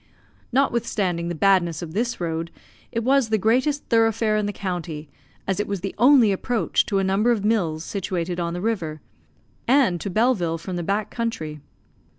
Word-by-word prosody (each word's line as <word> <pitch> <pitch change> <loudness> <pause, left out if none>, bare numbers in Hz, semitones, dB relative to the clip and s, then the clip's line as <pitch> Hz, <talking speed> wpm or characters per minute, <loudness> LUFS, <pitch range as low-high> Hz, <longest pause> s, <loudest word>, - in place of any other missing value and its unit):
Notwithstanding 215 -9 0
the 175 - -3
badness 175 -2 +2
of 160 -2 -7
this 235 +4 -1
road, 165 -1 -3 0.4
it 230 - -2
was 265 -1 +3
the 220 - +2
greatest 255 +8 +1
thoroughfare 225 -1 +2
in 210 -1 0
the - - -1
county, 175 -6 -5 0.4
as 195 +1 -1
it 205 - -1
was 200 -3 -3
the 195 - -4
only 245 -3 +6
approach 225 +4 0
to 200 - 0
a 195 - +2
number 195 +5 +2
of 210 -4 0
mills 170 -8 0
situated 180 -3 -3
on 170 0 -2
the 175 - -4
river, 175 -8 -2 0.7
and 240 - +3
to 200 - -3
Belleville, 195 -6 +1
from 180 +3 -6
the 175 - -2
back 200 +4 -1
country. 160 -11 -3
200 Hz, 175 wpm, -23 LUFS, 175-230 Hz, 0.7 s, only